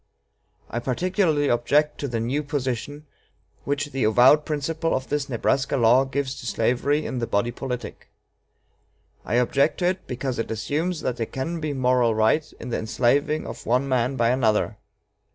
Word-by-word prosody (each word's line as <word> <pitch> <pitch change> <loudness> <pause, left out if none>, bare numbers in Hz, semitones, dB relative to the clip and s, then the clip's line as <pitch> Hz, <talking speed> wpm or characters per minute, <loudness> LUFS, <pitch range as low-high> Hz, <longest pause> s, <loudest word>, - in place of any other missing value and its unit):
I 120 - -3
particularly 155 - +1
object 145 +5 +2
to 140 - -2
the 120 -3 -2
new 125 +6 -1
position 145 0 -4 0.6
which 145 +1 -2
the 135 -2 -1
avowed 125 +7 +5
principle 160 +2 -1
of 130 0 -4
this 145 -1 -1
Nebraska 130 +3 0
law 120 +2 +5
gives 135 0 -2
to 125 - -7
slavery 125 +7 +1
in 130 - -3
the 115 - -2
body 100 +4 0
politic. 125 0 -6 1.2
I 110 - -2
object 135 +5 +2
to 180 - -1
it 185 +1 -1
because 125 0 -3
it 115 - -2
assumes 150 - -2
that 125 - -2
there 115 - -2
can 165 +6 -4
be 155 -2 -3
moral 125 -3 +2
right 110 +8 +2
in 125 - -7
the - - -1
enslaving 130 +7 +1
of - - -8
one 125 +3 +2
man 130 0 +1
by 115 -2 +2
another. 110 -4 +1
130 Hz, 170 wpm, -24 LUFS, 120-145 Hz, 1.2 s, avowed